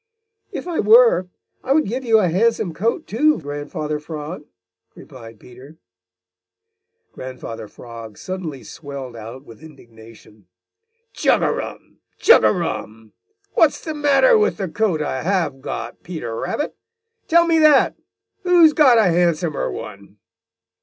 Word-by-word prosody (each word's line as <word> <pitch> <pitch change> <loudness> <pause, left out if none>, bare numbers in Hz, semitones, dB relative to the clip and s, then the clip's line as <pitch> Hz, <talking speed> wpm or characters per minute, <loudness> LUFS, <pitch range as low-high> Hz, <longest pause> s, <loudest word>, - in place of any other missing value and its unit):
"If - - -6
I 345 - -2
were, 215 -4 +5 0.3
I 265 - +1
would 310 +2 +2
give 250 +6 -4
you 225 -3 +4
a 205 -4 +2
handsome 195 0 0
coat, 230 - -2
too, 300 +8 +2
Grandfather 150 +1 -5
Frog," 150 +1 -8 0.5
replied 115 -5 -13
Peter. 130 +5 -15 1.3
Grandfather 125 -4 -8
Frog 115 -1 -11
suddenly 175 -8 -6
swelled 140 -5 -9
out 115 +5 -10
with 115 -2 -15
indignation. 115 - -17 0.7
"Chug - - +2
a - - +2
rum! - - -7 0.2
Chug 470 - +6
a - - +5
rum! 110 - -5 0.4
What's 315 -3 +3
the 315 - -6
matter 300 - +4
with 430 - +1
the 195 -3 -3
coat 175 -5 0
I 130 -3 -3
have 165 -6 -1
got, 120 -2 -6
Peter 155 -10 -6
Rabbit? 295 - -3 0.5
Tell 340 +1 +4
me 330 -1 +2
that! 305 -3 +5 0.5
Who's 350 -4 +5
got 270 -7 +5
a 225 - +5
handsomer 170 -3 0
one?" 100 -1 -10
165 Hz, 135 wpm, -20 LUFS, -, 1.3 s, Chug